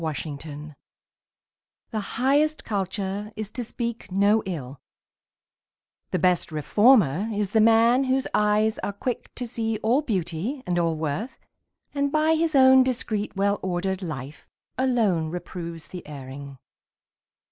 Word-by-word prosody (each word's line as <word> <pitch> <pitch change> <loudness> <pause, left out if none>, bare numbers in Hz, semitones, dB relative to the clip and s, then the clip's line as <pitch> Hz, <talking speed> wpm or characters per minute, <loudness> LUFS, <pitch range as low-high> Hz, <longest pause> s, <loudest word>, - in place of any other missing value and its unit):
TRUE 160 -1 -1 0.2
CULTURE 150 0 -9 1.2
The 220 - -1
highest 285 +8 +1
culture 200 0 -3
is 215 -1 -5
to 245 - -4
speak 235 -2 -5
no 200 +3 +3
ill, 140 -7 -6 1.3
The - - 0
best 180 -2 +2
reformer 200 - +3
is 205 -2 -2
the 220 - +4
man 230 +4 +5
whose 260 0 +1
eyes 210 +1 +2
Are 205 - -3
quick 240 +4 -4
to 245 - -3
see 225 -2 -2
all 240 +6 +3
beauty 215 - -3
and 175 -1 0
all 165 -1 +1
worth; 160 - -3 0.6
And 280 -1 0
by 310 +1 +3
his 320 -1 +1
own 260 -1 +7
discreet, 230 -5 -1
well 200 +1 +1
ordered 190 +1 -2
life, 150 -4 -7 0.3
Alone 220 -11 +1
reproves 170 -1 -7
the 180 - -8
erring. 140 -1 -9
205 Hz, 135 wpm, -25 LUFS, 170-245 Hz, 1.3 s, own